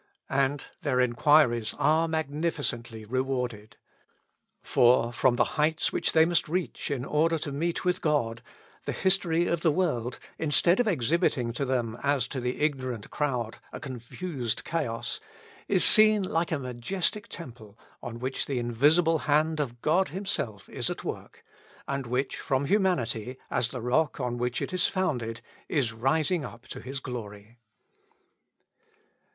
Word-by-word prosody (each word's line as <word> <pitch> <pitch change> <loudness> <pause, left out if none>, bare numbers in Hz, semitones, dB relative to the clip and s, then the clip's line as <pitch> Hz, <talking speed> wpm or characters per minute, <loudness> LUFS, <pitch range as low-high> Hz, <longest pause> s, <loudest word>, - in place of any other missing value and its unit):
And 140 +1 +1 0.2
their 140 -5 +1
enquiries 125 -2 +3
are 160 +2 +3
magnificently 145 -8 -2
rewarded. 125 -3 -3 0.9
For, 120 -1 +4
from 125 0 +3
the - - +4 0.2
heights 155 +2 +1
which - - +1
they 160 0 +6
must 170 -2 +1
reach 180 +1 -2
in 130 -3 -2
order 165 +3 +2
to 145 -1 -4
meet 165 +6 -2
with 180 0 +1
God, 115 -7 0 0.4
the - - -2
history 175 -3 +2
of 170 -1 0
the 165 - +4
world, 125 -9 -1 0.2
instead 165 - +3
of 245 - +3
exhibiting 140 - +1
to 140 - -2
them, 120 -3 -1
as 140 -3 +1
to 135 - -3
the 125 +3 -3
ignorant 130 -7 -2
crowd, 125 -6 -2
a - - -7
confused 130 - -4
chaos, 115 -9 -2 0.5
is 190 -3 +3
seen 215 -1 +6
like 170 -2 -1
a 160 - +1
majestic 140 - -2
temple, 115 - -10 0.2
on 120 -1 -6
which 130 +3 -2
the 135 - -2
invisible 150 +8 +3
hand 155 +2 +3
of 120 -5 -3
God 180 +5 +3
himself 140 - -3
is - - -2
at - - -5
work, - - -7 0.4
and 140 -2 -3
which, 125 +3 -1
from 140 -1 0
humanity, 135 - 0
as 120 - +1
the 125 0 -6
rock 135 +7 +1
on 120 -2 -2
which 125 0 -1
it - - -5
is 185 0 +3
founded, 125 - -2 0.3
is 130 -8 0
rising 150 +8 +1
up 120 0 -10
to - - -7
his 135 +2 -5
glory. 110 -2 -8
135 Hz, 150 wpm, -28 LUFS, 120-160 Hz, 0.9 s, they